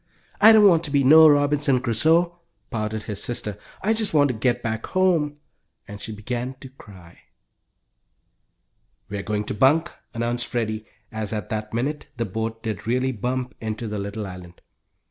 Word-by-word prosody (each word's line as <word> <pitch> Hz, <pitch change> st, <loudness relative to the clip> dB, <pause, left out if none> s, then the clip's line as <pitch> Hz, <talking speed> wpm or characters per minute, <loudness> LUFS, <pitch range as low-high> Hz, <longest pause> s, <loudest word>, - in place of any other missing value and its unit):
"I 220 Hz, +2 st, +9 dB
don't 215 Hz, -2 st, +7 dB
want 170 Hz, -3 st, +4 dB
to -, -, -5 dB
be 140 Hz, -1 st, +2 dB
no 155 Hz, +4 st, +8 dB
Robinson 145 Hz, -2 st, +3 dB
Crusoe!" 160 Hz, +9 st, +2 dB, 0.3 s
pouted 110 Hz, -1 st, -3 dB
his 105 Hz, -1 st, -4 dB
sister. 105 Hz, -4 st, -3 dB, 0.3 s
"I 215 Hz, +3 st, +2 dB
just 220 Hz, -6 st, 0 dB
want 145 Hz, -1 st, +5 dB
to -, -, 0 dB
get 120 Hz, +2 st, 0 dB
back 110 Hz, -1 st, -3 dB
home," 170 Hz, -6 st, +1 dB, 0.5 s
and 105 Hz, 0 st, -9 dB
she -, -, -6 dB
began 120 Hz, +4 st, -4 dB
to 135 Hz, -, -10 dB
cry. 95 Hz, -9 st, -16 dB, 1.9 s
"We're 100 Hz, 0 st, -4 dB
going 105 Hz, +1 st, -2 dB
to -, -, -4 dB
bunk," 135 Hz, +9 st, +3 dB, 0.2 s
announced 120 Hz, +1 st, -1 dB
Freddie, 110 Hz, -2 st, -3 dB, 0.2 s
as 110 Hz, -1 st, -4 dB
at 105 Hz, +2 st, -4 dB
that 110 Hz, -2 st, -4 dB
minute 140 Hz, +6 st, -3 dB
the 115 Hz, -, -1 dB
boat 115 Hz, +3 st, -4 dB
did 110 Hz, -2 st, -5 dB
really 130 Hz, +2 st, +1 dB
bump 125 Hz, +2 st, -3 dB
into 110 Hz, +1 st, -4 dB
the 105 Hz, -1 st, -4 dB
little 100 Hz, +2 st, -5 dB
island. 90 Hz, -2 st, -11 dB
120 Hz, 165 wpm, -23 LUFS, 110-145 Hz, 1.9 s, I